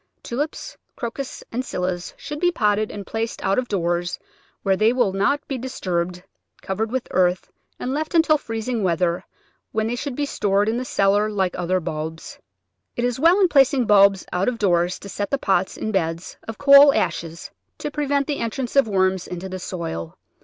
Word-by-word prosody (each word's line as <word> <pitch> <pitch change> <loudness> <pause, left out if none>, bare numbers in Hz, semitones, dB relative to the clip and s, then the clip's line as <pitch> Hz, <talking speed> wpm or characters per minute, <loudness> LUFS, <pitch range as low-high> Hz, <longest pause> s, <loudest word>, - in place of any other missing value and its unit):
Tulips, 290 +6 -4 0.2
Crocus, 255 +3 -5
and 250 +3 -2
Scillas 180 -6 -3
should 295 0 -6
be 355 +1 +3
potted 210 -6 +1
and 205 -1 -7
placed 225 +1 -3
out 195 - +2
of 250 - -3
doors 175 -3 -1 0.5
where 195 -1 +3
they 215 +4 +3
will 240 -6 +1
not 280 +9 0
be 270 -2 -3
disturbed, 180 -8 -3 0.4
covered 215 +3 -2
with 255 +1 -3
earth 180 0 +1 0.3
and 255 - -2
left 310 +4 -2
until 320 -2 +4
freez 225 -4 -5
ing 240 -3 -1
weather, 175 0 +1 0.5
when 220 0 0
they 230 +2 -1
should 265 +1 -4
be 290 - -1
stored 205 -6 +1
in 225 +2 0
the 255 - -3
cellar 205 -1 +2
like 190 -4 0
other 180 +1 0
bulbs. 160 0 -6 0.6
It 240 - 0
is 245 0 -1
well 335 +6 +5
in 380 - +5
placing 270 -4 +4
bulbs 200 -2 +5
out 180 +2 0
of 245 - -4
doors 175 -4 +2
to - - -11
set 200 0 -3
the 275 - +1
pots 190 -6 0
in 220 - -3
beds 165 -3 -2
of 225 - -6
coal 280 0 +8
ashes 165 0 -2 0.3
to 295 - -4
prevent 285 -1 0
the 290 -1 -2
entrance 235 +2 -3
of 275 -4 +5
worms 190 -2 +1
into 180 +1 -6
the 185 0 -5
soil. 125 - -5
210 Hz, 190 wpm, -22 LUFS, 185-260 Hz, 0.6 s, coal